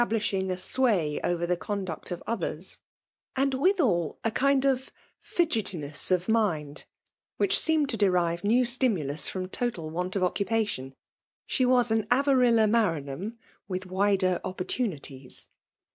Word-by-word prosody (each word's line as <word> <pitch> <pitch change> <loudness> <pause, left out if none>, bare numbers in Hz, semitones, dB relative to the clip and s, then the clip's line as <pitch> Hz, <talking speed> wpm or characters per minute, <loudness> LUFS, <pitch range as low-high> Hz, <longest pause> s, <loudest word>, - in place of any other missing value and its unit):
2B5 240 - +1
blishing 205 -4 0
a 185 - -1
sway 185 - +1
oyer 175 -1 0
the 180 +1 +1
conduct 190 -2 -4
of 175 -1 -5
others; 190 -5 -2 0.6
and 270 +1 +1
mthal 260 - +2
a 225 - +1
certain 275 -1 +3 0.4
fidgetiness 185 - -1
of 180 -1 +1
mind> 165 -10 0 0.5
which 400 - +3
seemed 315 -3 +2
to 230 - -3
derive 175 -4 +2
new 240 +5 +3
stimulus 195 - 0
from 185 -1 -4
total 185 -7 -3
want 180 +3 -3
of 195 - +1
occupation. 195 -9 -1 0.5
She 255 - +1
was 245 -2 +3
an 220 -1 +1
Avarilla 245 -3 +4
Maran 205 -10 +1
ham, 200 +12 -6 0.3
with 185 -1 -3
wi^er 185 -1 +1
opportunities. 175 - -4
200 Hz, 135 wpm, -27 LUFS, 175-240 Hz, 0.6 s, Avarilla